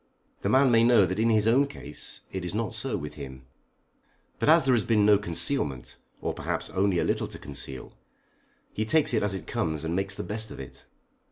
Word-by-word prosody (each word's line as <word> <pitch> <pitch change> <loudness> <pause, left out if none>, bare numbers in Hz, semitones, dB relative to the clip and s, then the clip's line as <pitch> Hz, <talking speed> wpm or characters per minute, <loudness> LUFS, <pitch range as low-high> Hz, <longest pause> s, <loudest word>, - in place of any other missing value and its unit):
The - - -1
man 135 -1 +4
may 115 -1 +5
know 115 -4 +6
that 95 +3 -3
in 115 +1 +3
his 110 -1 +3
own 135 +5 +4
case 140 - -4
it 95 -1 -4
is 90 +3 -4
not 110 -2 -2
so - - -1
with 75 - -6
him. 65 -3 -9 1.0
But - - +1
as 160 -1 +6
there 130 - +4
has 115 -3 +2
been 105 -3 +3
no 105 -1 +6
concealment, 85 - -2 0.2
or - - -2
perhaps - - -3
only 95 -1 +1
a - - +2
little - - 0
to - - -9
conceal, 65 -1 -6 0.8
he 110 - -1
takes 140 +5 +2
it 110 - +2
as 100 -1 0
it 90 -4 -7
comes 80 -2 -2
and 80 +1 -2
makes 95 +1 -1
the - - -5
best 110 +1 -3
of - - -9
it. 65 - -11
105 Hz, 215 wpm, -27 LUFS, 85-115 Hz, 1.0 s, know